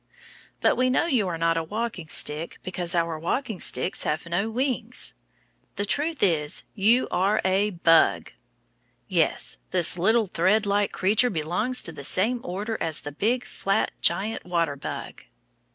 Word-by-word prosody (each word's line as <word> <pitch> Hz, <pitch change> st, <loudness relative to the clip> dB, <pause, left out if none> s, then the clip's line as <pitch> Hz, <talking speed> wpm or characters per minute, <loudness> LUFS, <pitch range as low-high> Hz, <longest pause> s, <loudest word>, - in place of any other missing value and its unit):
But -, -, +3 dB
we 255 Hz, 0 st, +2 dB
know 255 Hz, -, +2 dB
you 250 Hz, -, +1 dB
are 170 Hz, -2 st, -3 dB
not 165 Hz, 0 st, +1 dB
a 165 Hz, -, 0 dB
walking 210 Hz, -1 st, -4 dB
stick 155 Hz, +2 st, -1 dB
because 180 Hz, -1 st, -1 dB
our 165 Hz, -2 st, 0 dB
walking 215 Hz, -, -2 dB
sticks 185 Hz, -, +1 dB
have 155 Hz, +3 st, -2 dB
no 175 Hz, +6 st, -1 dB
wings. 250 Hz, 0 st, -2 dB, 0.6 s
The 205 Hz, -, -2 dB
truth 295 Hz, +6 st, -1 dB
is 155 Hz, -6 st, +1 dB
you 225 Hz, +5 st, +3 dB
are 200 Hz, +4 st, +2 dB
a 195 Hz, +2 st, +2 dB
bug! 165 Hz, -4 st, +3 dB, 0.8 s
Yes, -, -, 0 dB
this 175 Hz, -1 st, +2 dB
little 220 Hz, +5 st, +3 dB
threadlike 200 Hz, +3 st, +1 dB
creature 210 Hz, +6 st, +2 dB
belongs 180 Hz, +9 st, -1 dB
to -, -, -5 dB
the 145 Hz, -3 st, -9 dB
same 215 Hz, -, +2 dB
order 205 Hz, +5 st, -4 dB
as 160 Hz, -2 st, -2 dB
the 145 Hz, -, -6 dB
big 230 Hz, -, 0 dB
flat 195 Hz, +2 st, -1 dB
giant 215 Hz, +3 st, 0 dB
water 170 Hz, -4 st, -1 dB
bug. 140 Hz, -, -7 dB
195 Hz, 150 wpm, -25 LUFS, 170-225 Hz, 0.8 s, But